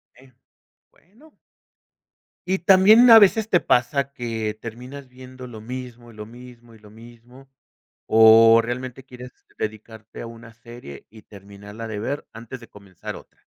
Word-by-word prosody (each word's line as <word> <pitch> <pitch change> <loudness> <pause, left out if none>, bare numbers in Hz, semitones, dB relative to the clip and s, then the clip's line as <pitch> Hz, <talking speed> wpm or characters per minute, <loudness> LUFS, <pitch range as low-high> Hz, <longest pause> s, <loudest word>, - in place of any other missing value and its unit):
Eh, 130 +1 -21 0.6
bueno. 235 - -25 1.1
Y 190 +1 -1
también 200 +7 +5
a 225 - +10
veces 215 +1 +2
te 175 - +2
pasa 140 +3 0
que 115 -4 -5
terminas 125 +4 -10
viendo 130 0 -13
lo 110 -3 -11
mismo, 120 0 -10
y - - -18
lo 105 0 -9
mismo, 120 0 -16
y 110 - -19
lo 105 - -18
mismo, 120 +4 -17 0.6
¿o 115 +1 +6
realmente 125 +2 -7
quieres 125 -1 -13 0.3
dedicarte 110 0 -8
a - - -8
una 115 0 -14
serie 120 - -13
y 110 - -16
terminarla 100 +2 -12
de 105 -2 -6
ver 135 +6 -5
antes 115 +3 -10
de 115 - -15
comenzar 100 -3 -11
otra? - - -17
120 Hz, 150 wpm, -21 LUFS, 110-130 Hz, 1.1 s, a